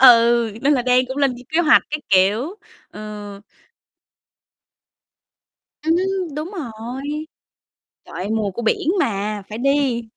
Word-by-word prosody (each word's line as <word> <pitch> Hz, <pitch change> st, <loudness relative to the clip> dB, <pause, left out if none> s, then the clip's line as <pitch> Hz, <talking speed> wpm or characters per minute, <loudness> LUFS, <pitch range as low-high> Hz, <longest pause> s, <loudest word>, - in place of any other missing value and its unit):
Ừ, 235 Hz, -2 st, +6 dB
nên 285 Hz, +2 st, +4 dB
là 260 Hz, -4 st, +2 dB
đang 250 Hz, +1 st, +3 dB
cũng 260 Hz, +1 st, -6 dB
lên 275 Hz, -3 st, +2 dB
kế 320 Hz, +2 st, +2 dB
hoạch 310 Hz, -2 st, +6 dB
các 300 Hz, 0 st, -2 dB
kiểu, 210 Hz, -, +3 dB, 0.3 s
ờ. 210 Hz, -1 st, -8 dB, 2.4 s
Ừm 320 Hz, +2 st, +2 dB
hứm, 370 Hz, -4 st, -1 dB
đúng 305 Hz, +4 st, -4 dB
rồi. 245 Hz, -, -6 dB, 1.0 s
Trời -, -, -13 dB
ơi, 180 Hz, +4 st, -4 dB
mùa 220 Hz, -2 st, 0 dB
của 215 Hz, +6 st, -6 dB
biển 230 Hz, +6 st, 0 dB
mà, 205 Hz, -, -1 dB
phải 215 Hz, -, -6 dB
đi, 275 Hz, -2 st, +1 dB
245 Hz, 135 wpm, -21 LUFS, 215-295 Hz, 2.4 s, Ừ